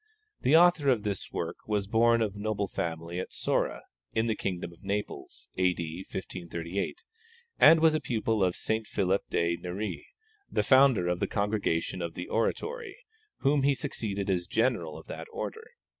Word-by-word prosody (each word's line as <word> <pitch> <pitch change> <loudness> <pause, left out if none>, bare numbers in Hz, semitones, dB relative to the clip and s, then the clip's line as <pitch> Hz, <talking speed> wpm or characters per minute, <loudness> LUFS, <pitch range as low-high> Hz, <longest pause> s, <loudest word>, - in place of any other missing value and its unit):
The 135 +5 +4
author 175 -4 +5
of 120 -5 +2
this 100 -3 -3
work - - -3
was 105 -2 0
born 115 +2 +4
of 105 -2 -3
noble 105 -1 -1
family 85 0 -4
at 95 - -5
Sora, - - -1 0.3
in 110 - +1
the 115 - +1
kingdom 90 -4 -4
of 85 - -20
Naples, 105 +1 -4
A.D. 90 -1 0
1538, 90 - -4 0.6
and 165 0 +8
was 160 0 +5
a 155 - +2
pupil 110 -5 0
of 90 -1 +1
St. 110 -1 -1
Philip 95 -1 +1
de 85 0 +1
Neri, 90 +1 -5 0.4
the - - +1
founder 130 -9 +5
of 90 0 0
the - - 0
Congregation 100 -4 -1
of 85 -1 -4
the 90 - -6
Oratory, 440 - -2 0.4
whom 140 0 +3
he 140 +1 +3
succeeded 100 -5 -3
as 90 -2 -1
General 110 -10 0
of - - -11
that - - -7
order. - - -5
105 Hz, 165 wpm, -29 LUFS, 90-120 Hz, 0.6 s, and